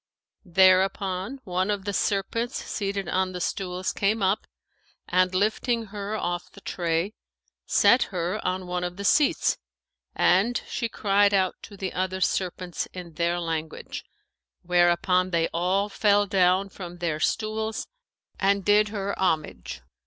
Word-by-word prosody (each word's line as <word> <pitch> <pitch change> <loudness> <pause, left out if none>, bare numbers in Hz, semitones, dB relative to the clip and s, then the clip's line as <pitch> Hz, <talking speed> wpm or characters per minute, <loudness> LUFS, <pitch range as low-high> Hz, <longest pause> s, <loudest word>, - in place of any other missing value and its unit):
There 185 +1 +6
upon, 195 +6 -3
one 185 0 -1
of 205 -1 -1
the 205 - -2
serpents 225 +5 -1
seated 200 -2 -3
on 185 0 0
the 180 - -4
stools 180 +1 -2
came 205 +1 +1
up 195 +3 +1 0.6
and, 185 +1 +2
lifting 225 +4 +1
her 205 +1 -3
off 175 -4 -3
the 200 - -15
tray, 170 +3 -1 0.5
set 250 - +5
her 180 +2 -3
on 185 0 -1
one 180 0 -2
of 180 0 -4
the 200 - -5
seats 295 +7 +3 0.6
and 205 +7 +3
she 235 - -2
cried 205 -1 +3
out 185 -1 +2
to 205 - -11
the 190 -1 -4
other 185 +1 -2
serpents 180 -1 -1
in 175 -2 -8
their 170 +2 0
language, 160 -2 -4 0.6
whereupon 180 +1 +3
they 165 -2 +1
all 185 +4 +1
fell 205 0 +3
down 190 0 +2
from 175 -2 -9
their 165 -3 -2
stools 220 +4 -1 0.5
and 200 -1 +2
did 210 +1 +5
her 200 -1 -3
homage. 160 -5 -1
190 Hz, 145 wpm, -26 LUFS, 180-205 Hz, 0.6 s, There